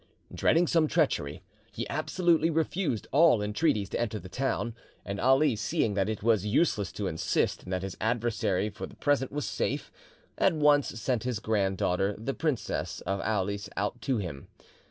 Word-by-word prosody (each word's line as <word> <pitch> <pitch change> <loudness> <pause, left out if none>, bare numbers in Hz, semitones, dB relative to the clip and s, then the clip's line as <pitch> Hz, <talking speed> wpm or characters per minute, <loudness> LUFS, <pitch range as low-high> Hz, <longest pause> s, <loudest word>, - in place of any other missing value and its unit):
Dreading 170 +2 +3
some 165 -2 +3
treachery, 115 - 0 0.3
he 115 +3 -4
absolutely 165 0 +1
refused 160 - -1
all 155 -5 +5
entreaties 105 0 +1
to - - -3
enter 110 -2 -1
the 90 -2 -9
town, 125 0 -1 0.3
and 100 0 -4
Ali 135 +2 +4
seeing 105 0 0
that 100 +1 0
it 110 -2 -4
was 110 -4 +3
useless 105 - +1
to 105 - -3
insist, 80 -3 0
and 90 - -9
that 90 0 -1
his 95 -1 -5
adversary 110 -3 0
for 100 - -7
the - - -15
present 145 -3 +1
was 145 +1 -3
safe, - - -2 0.5
at 190 - +4
once 150 -2 +4
sent 120 0 0
his 125 -2 -1
grand 100 -3 0
daughter, 95 +4 0
the 125 +5 -3
Princess 150 -8 -2
of 95 +1 -2
Aulis, 100 -1 -1
out 105 +5 -2
to 135 -3 0
him. 85 -9 -5
110 Hz, 175 wpm, -29 LUFS, 100-145 Hz, 0.5 s, all